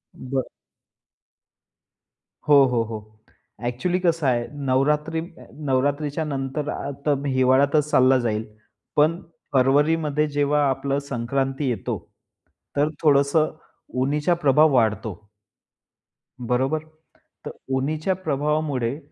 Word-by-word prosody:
बरं. 130 0 -4 2.0
हो, 145 -2 +8
हो, 125 -3 +1
हो, 110 -1 -6 0.7
ॲक्च्युअली 125 +10 -1
कसं 165 -5 +1
आहे, 120 -2 +1 0.2
नवरात्री 150 +5 +1 0.4
नवरात्रीच्या 145 +3 0
नंतर 140 +1 -3
आता 140 +1 -2
हिवाळ्यातच 135 +3 +3
चालला 130 -1 +5
जाईल, 110 -2 -1 0.5
पण 155 +3 +3 0.3
फरवरीमध्ये 150 +3 +2
जेव्हा 145 0 +1
आपलं 140 +1 -1
संक्रांती 135 +3 -1
येतो 110 -6 -2 0.8
तर 145 +1 +2
थोडंसं 145 +1 +3 0.5
उन्हाचा 150 +5 +1
प्रभाव 150 +2 +5
वाढतो. 110 -4 +1 1.2
बरोबर, 125 +5 0 0.7
तर - - -3 0.2
उन्हाच्या 155 +7 0
प्रभावामुळे 150 -5 -1
140 Hz, 90 wpm, -23 LUFS, 130-150 Hz, 2.0 s, हो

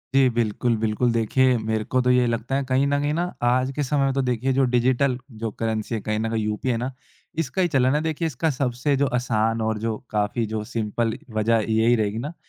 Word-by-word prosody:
जी। 135 -1 +5
बिल्कुल, 115 0 0
बिल्कुल 110 +2 +1
देखिए 125 +3 +3
मेरे 110 -1 -1
को 130 - 0
तो 125 - +1
ये 125 0 +4
लगता 115 +3 -2
है। 140 - +1
कहीं 130 +2 +3
न 145 0 +1
कहीं 145 +1 0
न 175 +3 -1 0.2
आज 130 +2 +1
के 145 - 0
समय 140 +1 +1
में 135 - +1
तो 135 - +1
देखिए 125 +2 0
जो 135 - +3
डिजिटल 125 +1 +2 0.3
जो 110 - -1
करेंसी 110 0 -2
है - - -2
कहीं 110 +1 -2
न 115 +1 -1
कहीं 110 -1 -1
यूपीआई 105 +4 -2
है 120 - +1
ना 125 +3 -3 0.5
इसका 165 +5 -1
ही 175 - +3
चलन 130 -2 +2
है। 150 - +1
देखिए 160 +1 -2
इसका 160 +3 -1
सबसे 130 +1 0
जो 140 - +2
आसान 115 -2 0
और 110 0 0
जो 110 0 -1
काफ़ी 105 +2 0
जो 110 0 -3
सिंपल 115 0 -1 0.2
वज़ह 110 +1 +3
यही 110 +2 +4
रहेगी 105 -1 -1
ना। 145 +8 -4
120 Hz, 235 wpm, -23 LUFS, 110-135 Hz, 0.5 s, जी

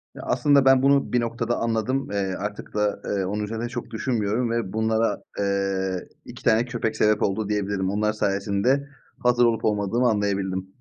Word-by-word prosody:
Ya, - - -8
aslında 140 -2 +3
ben 135 -1 +6
bunu 140 -1 +3
bir 120 - +3
noktada 115 0 -2
anladım. 115 +3 -1
Eee, 95 -2 -1
artık 105 +1 -6
da, 105 -1 0
eee, 100 -2 -1
onun 105 +2 -2
üzerine 115 +3 -4
çok 120 -2 -6
düşünmüyorum 115 0 -1
ve 115 -5 -2
bunlara, 110 -1 0 0.2
eee, 95 -2 -1 0.2
2 - - -11
tane 115 +3 +3
köpek 120 -2 -2
sebep 105 -1 +3
oldu 100 +1 -1
diyebilirim. 100 -2 -1
Onlar 105 +2 0
sayesinde 110 +7 0 0.3
hazır 125 0 +3
olup 115 -2 +1
olmadığımı 110 +4 +1
anlayabildim. 95 -3 -1
110 Hz, 165 wpm, -24 LUFS, 100-120 Hz, 0.3 s, ben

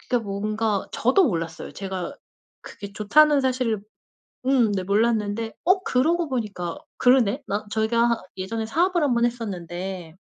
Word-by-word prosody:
진짜 245 - 0
뭔가 210 +1 -1
저도 265 +11 +3
몰랐어요. 165 - -3
제가 190 +6 -5 0.5
그게 200 0 -10
좋다는 290 +8 +4
사실을 255 -5 0 0.7
음 255 -5 +4
네 185 - -2
몰랐는데 220 +1 0
어 370 +1 +3
그러고 330 +4 +1
보니까 210 -9 -3 0.2
그러네 245 -5 +3
나 205 +2 -2
저희가 230 +1 +1
예전에 220 +4 -3
사업을 345 +7 +1
1번 240 -5 +2
했었는데 185 -6 -4
225 Hz, 295 characters per minute, -24 LUFS, 200-255 Hz, 0.7 s, 좋다는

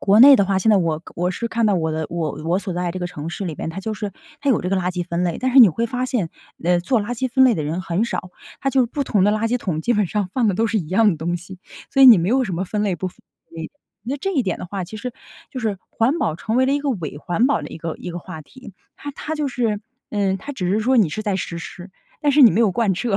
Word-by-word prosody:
国 205 +2 +4
内 275 +1 +10
的 200 - +3
话， 195 0 +1
现 220 - 0
在 210 - +6
我 165 -4 0 0.2
我 180 +2 0
是 235 +5 -3
看 230 0 0
到 205 - +3
我 160 -2 0
的 160 0 -2
我 165 -3 -2
我 170 +3 +1
所 195 -2 -5
在 175 -1 -1
这 185 - -5
个 175 - -2
城 160 -3 -7
市 195 - -5
里 165 -4 -4
边， 160 - -4
它 180 - -7
就 220 +3 -3
是 205 -2 -5 0.3
它 280 - +1
有 245 - +2
这 180 - -3
个 195 - +2
垃 180 0 0
圾 175 -1 -3
分 170 0 -2
类， 170 - -2
但 255 0 -1
是 275 - +6
你 220 - +10
会 230 +8 -1
发 250 +2 -2
现， 230 -11 -1 0.4
呃， 175 0 +3
做 230 +6 +1
垃 210 +3 -5
圾 260 +2 -2
分 265 +1 +4
类 250 -4 +5
的 155 - -2
人 160 +5 -2
很 185 +5 0
少， 180 -5 -4 0.3
它 275 - 0
就 265 -2 +3
不 280 +4 -3
同 205 -6 +1
的 205 - +4
垃 220 +1 0
圾 245 - +1
桶 170 -9 -2
基 240 - +1
本 210 -2 +2
上 205 -1 -1
放 240 -5 +2
的 195 - +1
都 225 - +2
是 220 0 0
一 155 -4 -5
样 215 +4 +4
的 165 - -2
东 170 +3 -2
西。 175 +2 -11 0.3
所 270 - +4
以 - - +10
你 230 -7 +10
没 170 - 0
有 260 +4 +3
什 195 - -4
么 185 - -2
分 210 +2 -2
类 195 -4 0
不。 185 - -3
呃， - - -16 0.9
那 270 +4 -2
这 390 +7 -3
一 270 -7 +2
点 190 -4 -2
的 - - -6
话， 195 0 -4
其 215 - -9
实 250 +3 -5 0.4
就 255 - -4
是 215 -4 -2
环 260 +9 +1
保 155 - 0
成 220 +6 -2
为 260 0 +4
了 275 - +2
一 285 - +1
个 285 -1 -1
伪 165 - -4
环 175 +10 +1
保 280 - +1
的 - - -6
一 - - -9
个 165 0 -4
一 180 - -7
个 175 - -5
话 160 -3 -9
题。 255 - -14 0.2
它 285 - -7
它 315 +3 -5
就 300 -2 -1
是， 225 -5 -1 0.3
呃， 200 -2 0
它 285 +10 -7
只 185 -8 -3
是 205 - +2
说 255 +3 +2
你 210 -8 +4
是 215 +8 -4
在 205 -3 -1
实 170 -2 -4
施， 175 +3 -9 0.3
但 295 -2 +2
是 295 - +6
你 240 - +9
没 220 - +2
有 215 -4 +4
贯 205 -1 +1
彻， 195 +2 -1
205 Hz, 335 characters per minute, -21 LUFS, 175-240 Hz, 0.9 s, 内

